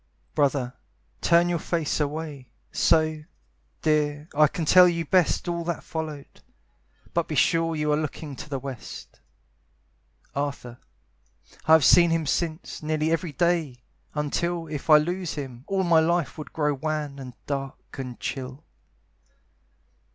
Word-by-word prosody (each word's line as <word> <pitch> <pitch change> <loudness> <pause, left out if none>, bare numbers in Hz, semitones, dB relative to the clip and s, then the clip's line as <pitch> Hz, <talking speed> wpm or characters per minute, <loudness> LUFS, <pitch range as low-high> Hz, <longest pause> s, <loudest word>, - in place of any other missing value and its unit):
Brother, 140 -4 +1 0.5
turn 170 +1 +4
your 175 -1 0
face 160 -2 -1
away, 150 -3 -4 0.2
So, 155 -1 +2 0.6
dear, 150 0 +1
I 150 0 +5
can 160 +2 -4
tell 180 +3 +8
you 170 -1 -2
best 180 +2 +2
All 170 -1 -1
that 170 -1 -3
followed; 155 -3 -6 0.7
but 170 -1 0
be 155 - -3
sure 165 +4 +2
You 150 -1 0
are - - +2
looking 150 -1 -4
to 150 - -8
the 140 - -2
west. 135 -2 -8 1.1
Arthur, 140 -4 -4 0.9
I 160 - +7
have 160 -4 +7
seen 170 -1 +7
him 165 -1 +1
since, 160 +3 -2
Nearly 155 +1 0
every 165 -1 -1
day, 165 -4 +1 0.4
until 165 +3 -1
If 150 0 -6
I 155 - +10
lose 175 +3 -2
him, 130 -3 -7
all 195 -1 0
my 170 -2 +5
life 170 0 +1
Would 155 - -8
grow 150 -2 0
wan, 150 0 -3
and 130 -2 -8
dark, 135 0 -5
and 125 -2 -6
chill. 130 +2 -5
155 Hz, 145 wpm, -25 LUFS, 140-165 Hz, 1.1 s, I